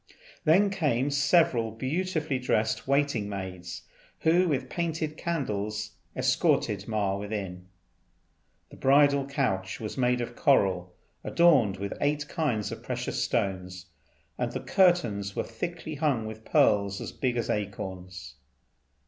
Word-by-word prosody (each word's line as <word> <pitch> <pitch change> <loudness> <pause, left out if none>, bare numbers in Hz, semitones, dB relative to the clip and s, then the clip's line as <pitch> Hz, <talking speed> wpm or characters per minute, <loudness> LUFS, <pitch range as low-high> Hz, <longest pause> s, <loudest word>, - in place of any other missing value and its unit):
Then 190 +6 +5
came 145 -7 0
several 140 -5 +3
beautifully 155 +4 -2
dressed 110 -2 0
waiting 140 -7 +1
maids, 90 -3 -6 0.4
who 175 +3 +4
with 135 -5 -1
painted 160 -1 -2
candles 105 - -3 0.2
escorted - - +1
Ma 105 -3 0
within. 100 -3 -5 1.0
The - - -12
bridal 140 0 +4
couch 95 -9 -1
was 110 +4 -5
made 125 0 +2
of 120 0 -4
coral 95 - +2 0.3
adorned 140 - +4
with 100 +1 -4
eight 145 0 0
kinds 125 - -1
of - - -7
precious - - -2
stones, 90 -1 -2 0.5
and - - -1
the - - -3
curtains 115 - +2
were - - 0
thickly 165 +7 -5
hung 140 -7 0
with 110 0 -8
pearls 100 -1 +3
as - - -5
big 125 -2 -1
as 115 - -1
acorns. 95 -6 -5
120 Hz, 125 wpm, -28 LUFS, 100-150 Hz, 1.0 s, Then